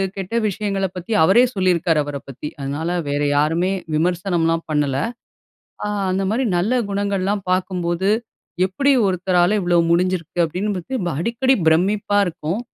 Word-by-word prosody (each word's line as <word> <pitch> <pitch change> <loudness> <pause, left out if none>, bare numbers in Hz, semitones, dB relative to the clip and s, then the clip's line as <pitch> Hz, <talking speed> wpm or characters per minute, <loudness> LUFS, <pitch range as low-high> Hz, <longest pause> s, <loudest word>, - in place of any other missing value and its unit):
கெட்ட 195 +3 -5
விஷயங்கள 200 -1 -2
பத்தி 180 +4 -7
அவரே 195 +9 +6
சொல்லியிருக்கிறாரு 175 -4 +2
அவர 145 0 -5
பத்தி. 135 +2 -7
அதனால 145 +4 -3 0.2
வேற 145 +1 -1 0.2
யாருமே 165 +5 +1 0.2
விமர்சனம்ல 175 0 +1 0.2
பண்ணல. 145 -3 +1 0.9
அ - - -1 0.2
அந்த 190 +1 0
மாதிரி 240 +5 0
நல்ல 195 +8 +1 0.2
குணங்கள்லாம் 200 0 -1
பார்க்கும்போது, 185 0 0 0.6
எப்படி 275 +10 +1 0.2
ஒருத்தரால 180 +1 +2
இவ்வளவு 175 -1 +3
முடிஞ்சிருக்கு 175 -1 0
அப்பிடீன்னு 190 +6 -2
பத்தி 220 +9 -4
ரொம்ப 175 -3 -2
அடிக்கடி 245 +6 +2
பிரமிப்பா 200 +5 +2
இருக்கும். 175 +2 -3
180 Hz, 130 wpm, -20 LUFS, 165-200 Hz, 0.9 s, அவரே